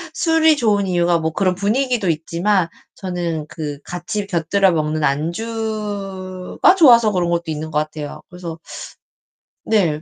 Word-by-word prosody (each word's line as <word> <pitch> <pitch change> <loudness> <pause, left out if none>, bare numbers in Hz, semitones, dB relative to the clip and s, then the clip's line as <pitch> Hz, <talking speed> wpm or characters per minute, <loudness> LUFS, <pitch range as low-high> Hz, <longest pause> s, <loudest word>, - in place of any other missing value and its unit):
술이 320 -2 +3
좋은 205 -6 +2
이유가 175 -1 +2
뭐 160 0 -1
그런 185 +1 +1
분위기도 220 +1 0
있지만 170 +4 +1 0.3
저는 175 -4 -3
그 150 -2 -6
같이 205 +4 -4
곁들여 190 +1 +2
먹는 155 -1 -1
안주가 195 - -1
좋아서 235 - +6
그런 180 -3 0
것도 170 0 0
있는 155 0 -4
것 150 - -1
같아요. 155 -1 -5
그래서 175 -2 -7 1.1
네. 170 -9 +1
180 Hz, 280 characters per minute, -19 LUFS, 160-210 Hz, 1.1 s, 좋아서